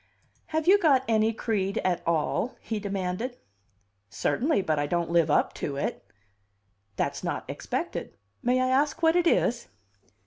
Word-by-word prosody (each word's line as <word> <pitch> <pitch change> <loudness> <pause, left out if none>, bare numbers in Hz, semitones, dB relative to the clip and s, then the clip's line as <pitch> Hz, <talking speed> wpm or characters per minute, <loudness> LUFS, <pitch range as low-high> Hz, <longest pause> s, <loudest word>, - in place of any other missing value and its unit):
"Have 315 0 -1
you 400 +2 +7
got 280 -8 +4
any 220 -1 +3
creed 205 -3 -1
at 180 -2 +1
all?" 170 +9 0
he 220 -2 -4
demanded. 200 +4 -3 0.7
"Certainly; 265 - 0
but 155 -4 0
I 145 - 0
don't 170 +1 -1
live 170 -2 +3
up - - +2
to 140 - -2
it." 140 - -3 0.9
"That's - - -2
not - - -3
expected. - - -4 0.2
May 250 +1 +2
I 255 - +1
ask 285 +5 +1
what 325 +1 +5
it 350 -1 +3
is?" 235 -7 +1
225 Hz, 150 wpm, -27 LUFS, 180-270 Hz, 0.9 s, you